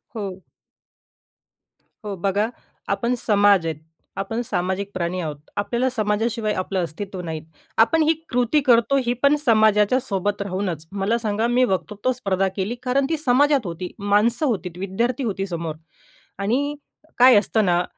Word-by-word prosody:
हो. 195 Hz, -4 st, -6 dB, 1.6 s
हो 205 Hz, -2 st, -4 dB
बघा, 200 Hz, +3 st, 0 dB, 0.4 s
आपण 235 Hz, +5 st, 0 dB
समाज 205 Hz, -5 st, +3 dB
आहेत. 160 Hz, -2 st, -3 dB, 0.4 s
आपण 225 Hz, +5 st, -2 dB
सामाजिक 190 Hz, +1 st, -2 dB
प्राणी 180 Hz, 0 st, -2 dB
आहोत. 155 Hz, -3 st, -4 dB, 0.2 s
आपल्याला 235 Hz, +5 st, 0 dB
समाजाशिवाय 215 Hz, 0 st, 0 dB
आपलं 185 Hz, 0 st, -2 dB
अस्तित्व 185 Hz, +3 st, -6 dB
नाहीत. 160 Hz, -3 st, -5 dB, 0.4 s
आपण 275 Hz, +9 st, +4 dB
ही 315 Hz, +1 st, +4 dB, 0.2 s
कृती 245 Hz, +4 st, +2 dB
करतो 245 Hz, +2 st, +4 dB
ही 240 Hz, -, +1 dB
पण 280 Hz, +1 st, +6 dB
समाजाच्या 215 Hz, +1 st, +4 dB
सोबत 205 Hz, -4 st, -2 dB
राहूनच. 185 Hz, -5 st, -3 dB
मला 200 Hz, +4 st, 0 dB
सांगा, 220 Hz, 0 st, -1 dB
मी 245 Hz, +1 st, +3 dB
वक्तृत्व 205 Hz, +6 st, -1 dB
स्पर्धा 195 Hz, -6 st, 0 dB
केली 200 Hz, +4 st, -2 dB
कारण 265 Hz, +2 st, +1 dB
ती 320 Hz, -, 0 dB
समाजात 280 Hz, -2 st, +3 dB
होती. 175 Hz, +1 st, -5 dB
माणसं 210 Hz, +7 st, +2 dB
होती, 205 Hz, -9 st, -1 dB
विद्यार्थी 230 Hz, +7 st, -1 dB
होती 195 Hz, -4 st, -2 dB
समोर 165 Hz, -3 st, -4 dB, 0.6 s
आणि 265 Hz, +9 st, 0 dB, 0.4 s
काय 250 Hz, -1 st, +8 dB
असतं 215 Hz, +1 st, 0 dB
ना, 175 Hz, -1 st, +2 dB
205 Hz, 145 wpm, -22 LUFS, 190-240 Hz, 1.6 s, काय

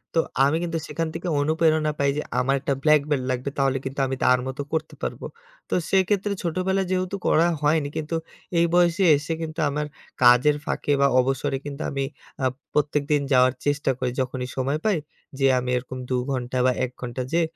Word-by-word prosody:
তো -, -, +4 dB, 0.3 s
আমি 150 Hz, +3 st, +2 dB
কিন্তু 165 Hz, -1 st, -2 dB
সেখান 165 Hz, -1 st, -2 dB
থেকে 170 Hz, +2 st, -5 dB
অনুপ্রেরণা 155 Hz, 0 st, +2 dB
পাই 140 Hz, 0 st, +3 dB
যে -, -, 0 dB, 0.2 s
আমার 135 Hz, +2 st, +2 dB
একটা 140 Hz, -, 0 dB
ব্ল্যাকবেলট 150 Hz, -3 st, +3 dB
লাগবে 130 Hz, +2 st, -2 dB
তাহলে 135 Hz, -1 st, +2 dB
কিন্তু 135 Hz, +1 st, -4 dB
আমি 135 Hz, -, -2 dB
তার 125 Hz, 0 st, +5 dB
মতো 130 Hz, +1 st, -4 dB
করতে 160 Hz, 0 st, -2 dB
পারবো। -, -, -4 dB, 0.4 s
তো -, -, -3 dB, 0.2 s
সেক্ষেত্রে 195 Hz, +1 st, +2 dB
ছোটবেলায় 185 Hz, +2 st, 0 dB
যেহেতু 185 Hz, +1 st, -1 dB
করা 165 Hz, +2 st, +4 dB
হয়নি, 150 Hz, -1 st, +2 dB
কিন্তু 155 Hz, +1 st, -3 dB, 0.4 s
এই 170 Hz, -, +5 dB
বয়সে 175 Hz, +2 st, +3 dB
এসে 150 Hz, +3 st, -3 dB
কিন্তু 160 Hz, +1 st, -5 dB
আমার 150 Hz, +1 st, -2 dB, 0.4 s
কাজের 125 Hz, +5 st, +6 dB
ফাঁকে, 145 Hz, -, -2 dB
বা 140 Hz, -, +6 dB
অবসরে 135 Hz, +2 st, 0 dB
কিন্তু 145 Hz, +1 st, -6 dB
আমি 140 Hz, -1 st, -1 dB, 0.4 s
আ -, -, +3 dB, 0.3 s
প্রত্যেকদিন 150 Hz, 0 st, +1 dB
যাওয়ার 125 Hz, 0 st, +5 dB
চেষ্টা 145 Hz, -1 st, +1 dB
করি 125 Hz, -1 st, -1 dB
যখনই 125 Hz, 0 st, -3 dB
সময় 140 Hz, +4 st, 0 dB
পাই। 210 Hz, -4 st, +3 dB, 0.4 s
যেয়ে 135 Hz, -1 st, +4 dB
আমি 125 Hz, -, -4 dB
এরকম 130 Hz, +1 st, -6 dB
২ 125 Hz, -, +1 dB
ঘন্টা 125 Hz, -1 st, -2 dB
বা 130 Hz, -, +5 dB
১ 125 Hz, -, -8 dB
ঘন্টা 125 Hz, +1 st, -4 dB
যে 170 Hz, -, +4 dB
145 Hz, 185 wpm, -24 LUFS, 130-165 Hz, 0.4 s, কাজের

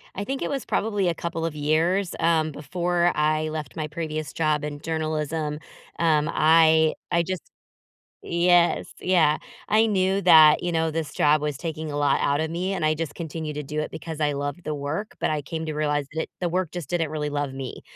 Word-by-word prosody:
I 200 Hz, -, -3 dB
think 270 Hz, +3 st, -3 dB
it -, -, -1 dB
was 275 Hz, -3 st, -3 dB
probably 205 Hz, -3 st, 0 dB
a 170 Hz, -, +2 dB
couple 165 Hz, 0 st, -4 dB
of 165 Hz, -2 st, -3 dB
years, 165 Hz, +6 st, +1 dB
um, 160 Hz, -2 st, +2 dB
before 175 Hz, +4 st, 0 dB
I 155 Hz, +1 st, +1 dB
left 155 Hz, -3 st, -6 dB
my 155 Hz, -1 st, -2 dB
previous 155 Hz, -1 st, -4 dB
job 155 Hz, -2 st, 0 dB
in 145 Hz, -1 st, -5 dB
journalism. 155 Hz, -1 st, -2 dB, 0.4 s
Um, 155 Hz, -3 st, +2 dB
I 160 Hz, 0 st, +5 dB, 0.2 s
I 170 Hz, 0 st, +3 dB
just 185 Hz, 0 st, -4 dB, 0.9 s
Yes, 175 Hz, 0 st, +3 dB, 0.2 s
yeah. 165 Hz, -5 st, +3 dB, 0.3 s
I 220 Hz, +1 st, +4 dB
knew 195 Hz, -2 st, +1 dB
that, 155 Hz, -3 st, +7 dB
you 175 Hz, -, -1 dB
know, 160 Hz, -1 st, +1 dB
this 160 Hz, -1 st, -3 dB
job 150 Hz, 0 st, +3 dB
was 150 Hz, -3 st, -2 dB
taking 160 Hz, -2 st, -5 dB
a -, -, -3 dB
lot 145 Hz, -1 st, +2 dB
outta 145 Hz, +3 st, +1 dB
me, 180 Hz, +4 st, -2 dB
and 190 Hz, -, -3 dB
I 155 Hz, 0 st, +3 dB
just 160 Hz, -1 st, -4 dB
continue 160 Hz, -2 st, -5 dB
to 150 Hz, 0 st, -4 dB
do 150 Hz, +2 st, -3 dB
it 155 Hz, -, -4 dB
because 160 Hz, -1 st, -7 dB
I 150 Hz, -1 st, +1 dB
love 145 Hz, 0 st, -3 dB
the 155 Hz, -, -2 dB
work, 145 Hz, +9 st, -4 dB
but -, -, +1 dB
I 150 Hz, -1 st, -1 dB
came 160 Hz, +3 st, -5 dB
to 155 Hz, -, -3 dB
realize 145 Hz, -2 st, 0 dB
that 160 Hz, -, -2 dB
the 175 Hz, -, 0 dB
work 180 Hz, -1 st, -1 dB
just 175 Hz, -6 st, -6 dB
didn't 165 Hz, -3 st, -1 dB
really 150 Hz, -1 st, -2 dB
love 145 Hz, -2 st, -2 dB
me. 135 Hz, -1 st, -7 dB
160 Hz, 205 wpm, -25 LUFS, 150-170 Hz, 0.9 s, that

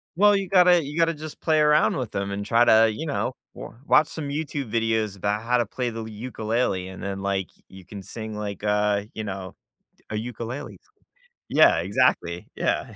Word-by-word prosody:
Well, 205 Hz, +2 st, +5 dB
you 195 Hz, -1 st, -1 dB
gotta 180 Hz, -3 st, +5 dB
you 145 Hz, +3 st, -7 dB
gotta 165 Hz, 0 st, +3 dB
just 155 Hz, 0 st, -9 dB
play 155 Hz, -1 st, +2 dB
around 150 Hz, 0 st, +4 dB
with 125 Hz, -5 st, -4 dB
'em 100 Hz, 0 st, -2 dB
and 100 Hz, +1 st, -4 dB
try 120 Hz, +1 st, +4 dB
to, 110 Hz, 0 st, +6 dB
you 155 Hz, +9 st, -5 dB
know, 145 Hz, -, -2 dB, 0.2 s
w -, -, -10 dB
watch 155 Hz, -, +5 dB
some 145 Hz, -3 st, -6 dB
YouTube 145 Hz, -5 st, -4 dB
videos 110 Hz, -3 st, 0 dB
about 105 Hz, +2 st, -1 dB
how 125 Hz, +1 st, +2 dB
to 120 Hz, -, +1 dB
play 125 Hz, +3 st, -3 dB
the 115 Hz, -, -6 dB
l 110 Hz, -, -7 dB
ukulele, 110 Hz, -3 st, -2 dB
and 95 Hz, +1 st, -9 dB
then, 100 Hz, 0 st, -4 dB
like, 95 Hz, -3 st, -1 dB, 0.2 s
you 95 Hz, -2 st, -14 dB
can 100 Hz, -2 st, -9 dB
sing 110 Hz, +2 st, -7 dB
like, 105 Hz, -1 st, -5 dB
uh, 105 Hz, -1 st, +1 dB
you 110 Hz, -, -5 dB
know, 95 Hz, -2 st, -6 dB, 0.6 s
a 110 Hz, -, -3 dB
ukulele. 120 Hz, +3 st, -6 dB, 0.7 s
Yeah, -, -, +5 dB
exactly, -, -, +1 dB
yeah. -, -, -1 dB
115 Hz, 195 wpm, -24 LUFS, 100-145 Hz, 0.7 s, to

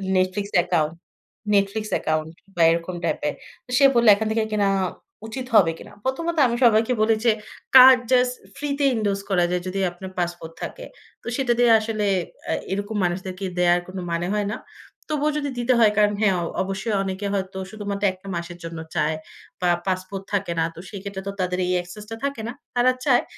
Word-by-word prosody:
Netflix 185 Hz, +2 st, 0 dB
account. 165 Hz, -3 st, +1 dB, 0.6 s
Netflix 205 Hz, +2 st, +1 dB
account 155 Hz, 0 st, -1 dB, 0.2 s
বা 170 Hz, -, 0 dB
এরকম 170 Hz, +2 st, -2 dB
টাইপের। -, -, -1 dB, 0.4 s
সে 275 Hz, -, +6 dB
বলল 235 Hz, -1 st, +4 dB
"এখান 220 Hz, +1 st, -2 dB
থেকে 220 Hz, 0 st, +1 dB
কিনা 205 Hz, -2 st, +2 dB, 0.6 s
উচিত 255 Hz, +3 st, -5 dB
হবে 175 Hz, -6 st, +6 dB
কিনা।" -, -, -12 dB
প্রথমত 330 Hz, +6 st, -2 dB
আমি 235 Hz, 0 st, -1 dB
সবাইকে 225 Hz, +2 st, +4 dB
বলি 220 Hz, 0 st, +4 dB
যে 230 Hz, -, +6 dB, 0.4 s
"কার্ড 260 Hz, 0 st, +10 dB
জাস্ট 250 Hz, -1 st, +4 dB, 0.2 s
ফ্রি 290 Hz, +1 st, -4 dB
তে 285 Hz, -, +3 dB
endorse 200 Hz, -2 st, -1 dB
করা 180 Hz, -2 st, +3 dB
যায় 180 Hz, -, 0 dB
যদি 195 Hz, +1 st, -3 dB
আপনার 185 Hz, +2 st, -9 dB
পাসপোর্ট 175 Hz, -2 st, -3 dB
থাকে।" -, -, -6 dB, 0.4 s
তো -, -, -13 dB
সেটা 255 Hz, -2 st, 0 dB
দিয়ে 240 Hz, -1 st, +5 dB
আসলে 215 Hz, -1 st, -2 dB, 0.5 s
আ -, -, +2 dB, 0.2 s
এরকম 205 Hz, +2 st, -3 dB
মানুষদেরকে 185 Hz, +2 st, -3 dB
দেয়ার 175 Hz, 0 st, +4 dB
কোন 185 Hz, -, -8 dB
মানে 170 Hz, +1 st, -1 dB
হয় 205 Hz, -1 st, 0 dB
না। -, -, -4 dB, 0.5 s
তবুও 300 Hz, 0 st, +1 dB
যদি 285 Hz, -1 st, -2 dB
দিতে 245 Hz, +1 st, +2 dB
হয় 220 Hz, -2 st, +6 dB
কারণ 210 Hz, -1 st, +4 dB
হ্যাঁ, 200 Hz, -3 st, +3 dB, 0.3 s
অবশ্যই 195 Hz, +3 st, -2 dB
অনেকে 190 Hz, +1 st, -4 dB
হয়তো 190 Hz, -1 st, -3 dB
শুধুমাত্র 205 Hz, -2 st, -5 dB
১ 185 Hz, -, -14 dB
টা -, -, -11 dB
মাসের 170 Hz, 0 st, -5 dB
জন্য 165 Hz, -1 st, -6 dB, 0.2 s
চায় 155 Hz, +1 st, +1 dB, 0.5 s
বা 180 Hz, -, +2 dB, 0.2 s
পাসপোর্ট 185 Hz, +1 st, -3 dB
থাকে 195 Hz, -3 st, 0 dB
না। -, -, +3 dB
তো -, -, -10 dB
সেক্ষেত্রে 200 Hz, -1 st, -6 dB
তো 200 Hz, -, -1 dB
তাদের 180 Hz, 0 st, -1 dB
এই 180 Hz, -, -1 dB
access 180 Hz, +4 st, -10 dB
টা 225 Hz, -, -5 dB
থাকে 280 Hz, -5 st, -3 dB
না। 235 Hz, -, -3 dB, 0.2 s
তারা 245 Hz, +1 st, +4 dB
চায়। 260 Hz, -4 st, +4 dB
200 Hz, 185 wpm, -23 LUFS, 180-230 Hz, 0.6 s, কার্ড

